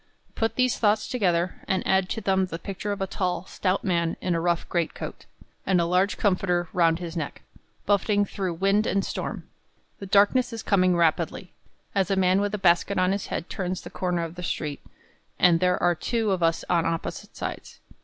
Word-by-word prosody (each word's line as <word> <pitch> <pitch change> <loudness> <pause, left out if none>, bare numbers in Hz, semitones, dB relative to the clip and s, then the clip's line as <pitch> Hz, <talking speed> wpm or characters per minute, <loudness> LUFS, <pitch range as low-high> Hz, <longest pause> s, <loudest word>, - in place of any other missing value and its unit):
Put 225 0 -1
these 255 -1 +1
thoughts 210 -1 +2
together, 180 -7 0
and 190 -1 0
add 190 -1 +2
to 225 - -3
them 190 -2 +1
the 165 - -5
picture 195 +3 -5
of 200 -1 -4
a - - +1
tall, 185 -1 -2
stout 190 0 -1
man, 170 -3 0
in 180 - -1
a 165 - 0
rough 170 0 0
greatcoat, 170 -2 -3 0.4
and 190 - +2
with 170 - +3
a 170 - -2
large 185 +3 +2
comforter 180 -3 +1
round 165 -3 +3
his 170 -1 -6
neck, 155 -4 -5 0.4
buffeting 205 0 +2
through 190 -3 -3
wind 195 +5 +2
and 195 0 +1
storm. - - -5 0.5
The 195 - -7
darkness 230 +6 +3
is 225 - -5
coming 185 -3 +3
rapidly, 170 +2 0 0.4
as 195 -1 +1
a 195 - +2
man 190 +1 +3
with 205 +1 -1
a - - -2
basket 190 +1 +2
on 185 0 +3
his 200 0 -2
head 170 - -4
turns 185 -1 -3
the - - -10
corner 180 -2 -1
of 165 -1 -5
the 180 - -8
street, 150 -4 -3 0.6
and 170 -2 +5
there 180 0 +2
are 175 0 +4
two 220 +5 -1
of 185 -2 0
us 165 -1 +1
on 170 -2 +2
opposite 165 0 -4
sides. - - -6
185 Hz, 205 wpm, -25 LUFS, 175-200 Hz, 0.6 s, and